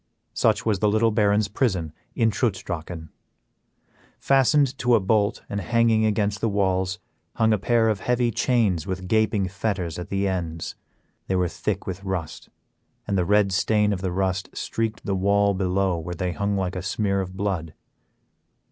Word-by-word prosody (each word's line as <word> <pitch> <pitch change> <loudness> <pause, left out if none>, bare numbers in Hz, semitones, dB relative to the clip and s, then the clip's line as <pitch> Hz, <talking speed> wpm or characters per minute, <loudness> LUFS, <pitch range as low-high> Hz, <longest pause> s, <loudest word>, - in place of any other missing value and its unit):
Such - - +1
was 105 -4 +1
the 105 - +2
little 110 +2 +3
baron's 105 0 +2
prison 95 - -1 0.2
in 115 -3 +2
Trutz 105 -1 -1
Drachen. 80 -1 -6 1.1
Fastened 135 0 +3
to 125 -1 +4
a - - +4
bolt 105 +1 +1
and 100 - -3
hanging 115 +2 +2
against 105 -1 0
the 115 - +1
walls, 95 -2 0 0.4
hung 110 -1 +3
a 105 - +1
pair 115 +2 +2
of 105 -3 +1
heavy 125 +1 +1
chains 110 -7 +1
with 95 -1 -4
gaping 110 -2 +2
fetters 95 -4 -3
at 90 +3 -7
the 100 0 0
ends. 85 -4 -3 0.5
They 95 - 0
were 90 -1 +2
thick 85 - -3
with 95 +1 -5
rust, 95 -5 -5 0.6
and 100 - -1
the 90 -2 +1
red 105 +1 +3
stain 105 +2 +2
of 90 - -4
the 95 -2 -2
rust 95 +1 -1
streaked 110 -1 -3
the 100 - -1
wall 100 +1 +2
below 95 -1 0
where 90 +2 -5
they 90 +1 -2
hung 100 +2 -1
like 95 -1 -2
a 90 - -3
smear 100 +1 0
of 95 0 -7
blood. 90 -6 -2
100 Hz, 175 wpm, -24 LUFS, 95-110 Hz, 1.1 s, to